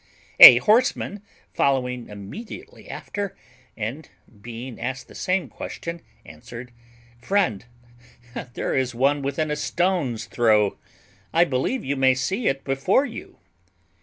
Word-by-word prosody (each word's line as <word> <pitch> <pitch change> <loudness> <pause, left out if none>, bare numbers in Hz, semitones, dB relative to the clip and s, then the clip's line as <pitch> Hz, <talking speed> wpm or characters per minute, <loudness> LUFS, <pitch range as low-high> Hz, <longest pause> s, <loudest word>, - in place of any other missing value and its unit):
A 120 - +13
horseman, 210 - +1 0.3
following 125 -3 0
immediately 220 - -10
after, 200 -1 -6 0.4
and 120 +8 -5 0.3
being 120 +2 -8
asked 130 +2 -4
the - - -15
same 185 -1 -1
question, 170 0 -7 0.2
answered, 120 +1 -11 0.5
"Friend, 130 - 0 0.9
there - - -2
is 130 -2 -1
one 140 +4 +2
within 140 +3 -2
a - - 0
stone's 150 - -1
throw; 105 0 +2 0.5
I 165 - +4
believe 140 - -2
you 140 +1 -2
may 130 -1 +4
see 190 - -2
it 135 0 -1
before 135 - +1
you." - - -9
135 Hz, 120 wpm, -23 LUFS, 120-180 Hz, 0.9 s, A